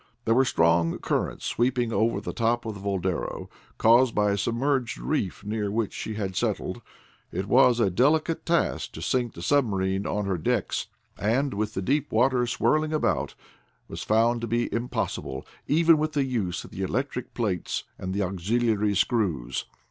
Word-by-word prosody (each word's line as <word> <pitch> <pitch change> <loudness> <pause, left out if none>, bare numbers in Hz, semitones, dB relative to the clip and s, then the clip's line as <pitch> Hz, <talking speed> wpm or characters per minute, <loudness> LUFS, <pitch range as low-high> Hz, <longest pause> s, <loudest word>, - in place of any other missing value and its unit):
There 115 - +3
were 130 +3 +4
strong 85 -6 +2
currents - - -2
sweeping 120 -1 0
over 115 +2 +1
the - - -5
top 115 +1 0
of 110 - -3
the 100 - -9
Boldero, 95 -3 -3 0.3
caused 120 +2 +5
by 105 -1 +3
a 100 - 0
submerged 125 - 0
reef 65 +11 -2
near 105 0 -2
which 110 0 -1
she 110 - -5
had 95 -3 -3
settled. - - -2 0.5
It 95 +2 -3
was 125 0 +5
a 100 -5 +3
delicate 155 - +2
task 170 -1 0
to - - -8
sink 125 -3 0
the 85 - -8
submarine 95 -7 +1
on 105 0 -1
her 95 -3 -1
decks, - - -1 0.3
and 130 +6 +1
with 105 +1 -2
the 95 - -2
deep 140 +6 0
waters 125 +1 +2
swirling 155 0 +1
about 155 - 0 0.5
was - - -7
found 115 +2 +2
to 115 - -3
be 120 +2 -1
impossible, 115 - -3 0.2
even 165 +1 +5
with 155 0 -1
the 140 -2 +1
use 105 -9 -2
of - - -13
the 95 - -6
electric 125 +6 -3
plates 100 -8 -1 0.2
and 95 - -4
the 100 +1 0
auxiliary 105 +3 0
screws. 95 - 0
115 Hz, 170 wpm, -26 LUFS, 100-125 Hz, 0.5 s, caused